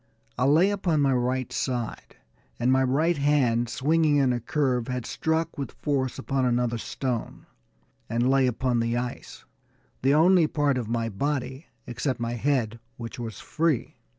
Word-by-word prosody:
I 125 Hz, -, 0 dB
lay 160 Hz, +8 st, +4 dB
upon 175 Hz, -7 st, 0 dB
my 135 Hz, -1 st, +3 dB
right 125 Hz, 0 st, -1 dB
side, 120 Hz, -4 st, -3 dB, 0.4 s
and 120 Hz, +2 st, +2 dB
my 130 Hz, 0 st, +4 dB
right 150 Hz, +6 st, +2 dB
hand, 130 Hz, -5 st, +2 dB
swinging 155 Hz, +4 st, +2 dB
in 135 Hz, -3 st, +3 dB
a 120 Hz, -, -1 dB
curve, 125 Hz, -1 st, 0 dB
had 125 Hz, -2 st, -3 dB
struck 160 Hz, 0 st, -1 dB
with 140 Hz, -, -4 dB
force 135 Hz, -3 st, -1 dB
upon 135 Hz, 0 st, -1 dB
another 120 Hz, -1 st, +1 dB
stone, 125 Hz, 0 st, -4 dB, 0.6 s
and 120 Hz, +2 st, +1 dB
lay 135 Hz, 0 st, +4 dB
upon 125 Hz, 0 st, 0 dB
the 115 Hz, +1 st, 0 dB
ice, 125 Hz, 0 st, -6 dB, 0.6 s
the 135 Hz, +2 st, +3 dB
only 170 Hz, +1 st, +5 dB
part 145 Hz, -4 st, +1 dB
of 115 Hz, -3 st, -5 dB
my 115 Hz, -1 st, -1 dB
body, 135 Hz, -, -3 dB, 0.2 s
except 130 Hz, +1 st, -3 dB
my 120 Hz, 0 st, -2 dB
head, 120 Hz, -3 st, 0 dB, 0.2 s
which 115 Hz, +2 st, -7 dB
was 115 Hz, -2 st, -6 dB
free. 160 Hz, -5 st, -1 dB
130 Hz, 160 wpm, -26 LUFS, 120-145 Hz, 0.6 s, only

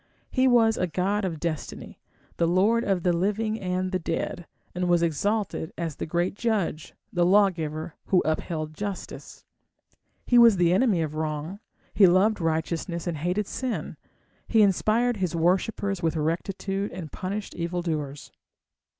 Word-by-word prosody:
He 260 Hz, 0 st, +3 dB
was 230 Hz, -3 st, +4 dB
a 180 Hz, -, 0 dB
god 190 Hz, +5 st, 0 dB
of 165 Hz, -4 st, -3 dB
Destiny, 160 Hz, -3 st, -5 dB, 0.4 s
the 170 Hz, -, +2 dB
lord 205 Hz, +7 st, +3 dB
of 190 Hz, -3 st, 0 dB
the 180 Hz, -, +3 dB
living 210 Hz, +5 st, 0 dB
and 185 Hz, 0 st, -2 dB
the 185 Hz, -, 0 dB
dead, 165 Hz, +1 st, -3 dB, 0.3 s
and 180 Hz, 0 st, -1 dB
was 175 Hz, -1 st, +3 dB
exalted 195 Hz, +2 st, -1 dB
as 165 Hz, -3 st, -3 dB
the -, -, -4 dB
great 175 Hz, +3 st, 0 dB
Judge, 205 Hz, -8 st, -2 dB, 0.2 s
the 175 Hz, -, +2 dB
lawgiver, 170 Hz, -5 st, +2 dB
who 185 Hz, -, +3 dB
upheld 155 Hz, 0 st, -2 dB
justice; 200 Hz, +2 st, -7 dB, 0.8 s
he 245 Hz, -, +5 dB
was 230 Hz, -4 st, +7 dB
the 175 Hz, 0 st, +3 dB
enemy 195 Hz, -5 st, +3 dB
of 155 Hz, -1 st, -4 dB
wrong, 155 Hz, +4 st, -3 dB, 0.3 s
he 195 Hz, -, +7 dB
loved 190 Hz, +3 st, +3 dB
righteousness 165 Hz, +1 st, -2 dB
and 170 Hz, -3 st, -2 dB
hated 180 Hz, +7 st, -1 dB
sin, 255 Hz, +4 st, -4 dB, 0.5 s
he 220 Hz, -2 st, +5 dB
inspired 215 Hz, +4 st, +2 dB
his 180 Hz, -3 st, -1 dB
worshippers 190 Hz, +3 st, 0 dB
with 165 Hz, 0 st, 0 dB
rectitude 195 Hz, +5 st, -2 dB
and 170 Hz, -4 st, -7 dB
punished 200 Hz, +3 st, -4 dB
evildoers. 165 Hz, -5 st, -3 dB
180 Hz, 150 wpm, -26 LUFS, 165-205 Hz, 0.8 s, was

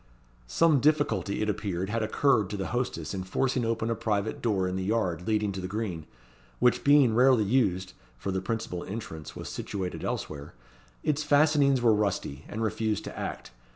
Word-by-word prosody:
Some 155 Hz, -, +3 dB
difficulty, 145 Hz, -8 st, +1 dB
it -, -, -1 dB
appeared, 100 Hz, -2 st, -2 dB
had 115 Hz, +1 st, 0 dB
occurred 110 Hz, -1 st, +2 dB
to 105 Hz, -, -4 dB
the 95 Hz, -, -3 dB
hostess 110 Hz, -, -2 dB
in 95 Hz, -, -3 dB
forcing 125 Hz, +7 st, 0 dB
open 115 Hz, 0 st, -1 dB
a -, -, 0 dB
private 105 Hz, -1 st, -1 dB
door 100 Hz, -5 st, +1 dB
in 90 Hz, -, -2 dB
the 95 Hz, -, -2 dB
yard 95 Hz, -5 st, -1 dB
leading 105 Hz, -2 st, +1 dB
to 95 Hz, -1 st, -5 dB
the 90 Hz, -, -4 dB
green, 95 Hz, -6 st, -4 dB, 0.5 s
which 125 Hz, -, +3 dB
being 140 Hz, -5 st, +5 dB
rarely 125 Hz, -1 st, +5 dB
used 95 Hz, -5 st, +1 dB, 0.2 s
(for 95 Hz, -, -3 dB
the 95 Hz, 0 st, -1 dB
principal 95 Hz, -3 st, -3 dB
entrance 95 Hz, -7 st, -7 dB
was -, -, -7 dB
situated 95 Hz, -3 st, -4 dB
elsewhere), 70 Hz, -4 st, -4 dB, 0.5 s
its 150 Hz, 0 st, +1 dB
fastenings 145 Hz, -3 st, +4 dB
were 115 Hz, -2 st, +6 dB
rusty, 100 Hz, -9 st, -1 dB
and 110 Hz, +2 st, -4 dB
refused 110 Hz, -1 st, -1 dB
to -, -, -7 dB
act. -, -, -5 dB
110 Hz, 180 wpm, -28 LUFS, 95-120 Hz, 0.5 s, were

